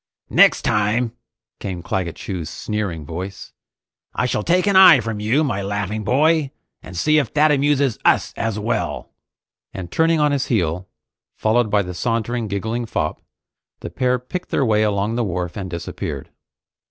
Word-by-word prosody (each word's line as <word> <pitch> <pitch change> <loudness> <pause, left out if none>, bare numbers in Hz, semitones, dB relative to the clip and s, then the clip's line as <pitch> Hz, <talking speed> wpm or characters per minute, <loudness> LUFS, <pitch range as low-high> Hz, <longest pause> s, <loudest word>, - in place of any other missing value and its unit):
"Next - - +5
time," 110 +3 +1 0.5
came 90 -4 -5
Claggett 85 -2 -2
Chew's 90 -5 -5
sneering 100 -8 -4
voice, 95 +5 -7 0.6
"I - - 0
shall 120 - 0
take 180 - +2
an 200 -1 +2
eye 190 -7 +9
from 110 -2 -4
you, 115 +9 +2
my 110 -9 -1
laughing 100 +1 -3
boy, 150 +6 +2 0.3
and 90 -1 -10
see 155 - +3
if 140 - -2
that 155 +1 +5
amuses 140 -3 +2
us - - +2
as 115 -2 -2
well!" 105 +2 -3 0.6
And 90 -2 -6
turning 165 0 +2
on 150 -1 +3
his 140 -2 -1
heel, 90 -4 -1 0.5
followed 110 +1 +1
by 100 0 +2
the 90 0 -6
sauntering, 115 +3 -2
giggling 110 +4 -3
fop, 75 -7 -2 0.6
the - - -7
pair 125 0 +1
picked 125 +9 -6
their 135 - +1
way 110 -2 +2
along 105 0 0
the 120 - +1
wharf 90 -3 -3
and 95 -2 -5
disappeared. 85 -1 -6
110 Hz, 165 wpm, -21 LUFS, 95-130 Hz, 0.6 s, eye